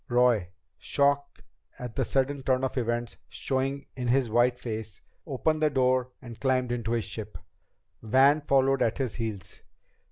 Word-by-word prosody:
Roy, 120 -7 +3 0.3
shock 140 0 0 0.3
at 125 -2 -7
the 135 - +1
sudden 135 +3 0
turn 130 0 +1
of 130 - -1
events 120 -1 -2
showing 135 +1 -2
in 125 -2 -3
his 125 -2 +2
white 120 +2 +3
face, 110 -4 -6 0.3
opened 155 +3 0
the 155 - +4
door 130 -2 +2
and 120 -2 -10
climbed 130 -2 +1
into 120 -2 -2
the 115 - +1
ship. 105 +2 -6 0.6
Van 135 +6 +4
followed 135 -1 +2
at 115 - +1
his 130 -5 -2
heels. 110 -5 -6
125 Hz, 155 wpm, -28 LUFS, 120-135 Hz, 0.6 s, the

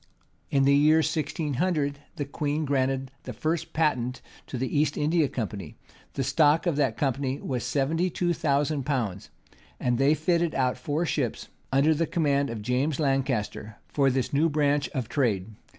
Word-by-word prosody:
In 135 -1 +2
the 140 +1 +5
year 155 +3 +5
1600, 150 -1 -1 0.2
the 145 - -3
queen 150 +2 -2
granted 135 -1 0
the 125 - -5
first 160 +7 -2
patent 130 -6 0 0.3
to 130 - -5
the 130 +3 -2
East 145 0 +2
India 155 +1 +2
Company: 100 - -5 0.4
the 135 - -1
stock 155 +4 +3
of 170 -4 +1
that 135 -6 +1
company 135 0 -1
was 125 -3 -3
seventy 145 +8 0
two 175 0 0
thousand 145 -2 0
pounds; 115 -9 -2 0.5
and 125 -1 0
they 140 +3 +4
fitted 170 +1 +1
out 130 -1 +1
four 150 +6 -1
ships, 140 -7 -2 0.2
under 140 +4 +4
the 165 +1 0
command 140 -4 +1
of 110 -2 -5
James 130 +5 0
Lancaster, 130 -7 -1
for 140 -2 +2
this 130 +2 -1
new 155 +4 +3
branch 145 -2 +1
of 130 -4 -3
trade. 110 -7 0
140 Hz, 165 wpm, -27 LUFS, 130-155 Hz, 0.5 s, the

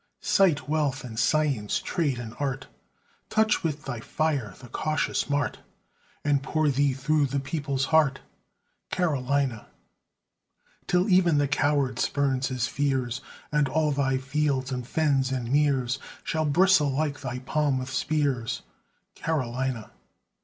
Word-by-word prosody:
Cite 165 -9 +3
wealth 145 -3 0
and 115 -3 -6
science, 135 -4 +1
trade 150 -8 -1
and 115 -2 -6
art, 135 -2 -2 0.6
Touch 220 0 +2
with 150 -3 -3
thy 120 -3 -4
fire 135 -6 -1
the 125 - -11
cautious 155 +5 -1
mart, 145 0 0 0.7
And 145 -2 +3
pour 155 +2 +1
thee 140 0 +2
through 145 +2 +1
the 140 +2 -1
people's 140 -1 -2
heart, 145 -4 +4 0.7
Carolina! 140 -8 0 1.2
Till 180 +2 +2
even 180 -5 +4
the 145 0 +2
coward 140 -2 +1
spurns 135 -2 +1
his 125 -2 -1
fears, 130 -4 -1 0.3
And 150 -2 +2
all 155 +1 +1
thy 135 -2 +1
fields, 135 0 -1
and 125 -1 -4
fens, 140 -3 +1
and 125 -2 -2
meres 135 -3 +2 0.2
Shall 160 -1 -1
bristle 165 0 +4
like 145 +1 -1
thy 125 -2 -4
palm 140 +2 0
with 130 +1 -4
spears, 140 -5 -1 0.5
Carolina! 130 -6 -2
140 Hz, 130 wpm, -26 LUFS, 130-150 Hz, 1.2 s, heart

